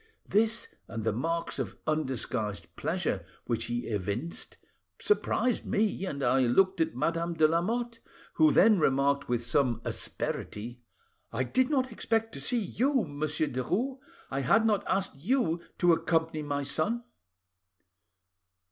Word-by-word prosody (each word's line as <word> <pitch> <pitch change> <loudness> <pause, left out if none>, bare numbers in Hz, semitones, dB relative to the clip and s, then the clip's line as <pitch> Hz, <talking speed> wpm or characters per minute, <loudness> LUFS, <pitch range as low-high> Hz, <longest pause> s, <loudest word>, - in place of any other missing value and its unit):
This 220 +2 +2 0.2
and 115 -1 -5
the 110 - +1
marks 165 +8 -2
of - - -4
undisguised 130 -8 -2
pleasure - - -1 0.2
which 115 -1 -1
he 120 0 -2
evinced 105 - -4 0.4
surprised 255 - +1
me, 205 -2 0
and 140 -5 -4
I 135 - +3
looked 185 +10 +3
at 160 0 0
Madame 170 +1 -1
de 155 -1 +5
Lamotte, 230 +9 -1 0.3
who 155 -2 +5
then 215 +5 +6
remarked 140 -1 +2
with 120 -1 0
some 120 -2 +2
asperity— 120 +4 -4 0.5
"'I 120 +3 0
did 255 - +1
not 260 -4 +1
expect 225 0 -1
to - - -6
see 245 - +1
you, 260 +6 +1
Monsieur 150 +1 -1
Derues. 185 - -2 0.3
I 135 - -1
had 220 - +3
not 210 -3 +2
asked 190 -6 -1
you 175 - +1 0.2
to 175 -1 +5
accompany 160 -1 0
my 145 -1 -2
son. 205 +12 -1
160 Hz, 140 wpm, -29 LUFS, 130-215 Hz, 0.5 s, then